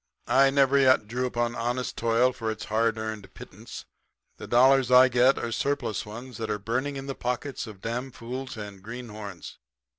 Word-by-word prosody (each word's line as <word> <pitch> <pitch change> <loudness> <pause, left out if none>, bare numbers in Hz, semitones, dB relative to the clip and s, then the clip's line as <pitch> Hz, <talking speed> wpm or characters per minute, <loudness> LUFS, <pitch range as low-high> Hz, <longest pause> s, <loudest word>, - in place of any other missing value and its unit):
'I 135 +3 +5
never 140 0 +4
yet 130 -5 +4
drew 125 +3 -1
upon 120 -1 -1
honest 120 +1 -2
toil 115 +2 +2
for 115 -2 -4
its 110 -1 -5
hard 115 0 +2
earned 110 -3 -5
pittance. - - -10 0.5
The - - -9
dollars 130 +1 +5
I 125 0 +7
get 125 +2 +4
are 120 - -3
surplus 120 -5 -2
ones 120 +3 -9
that 110 -1 -4
are 105 - 0
burning 130 +6 -3
the 135 - -4
pockets 125 +1 -4
of 105 -3 -11
damfools 125 +2 -5
and 100 -2 -8
greenhorns. 105 -5 -8
120 Hz, 170 wpm, -27 LUFS, 110-130 Hz, 0.5 s, I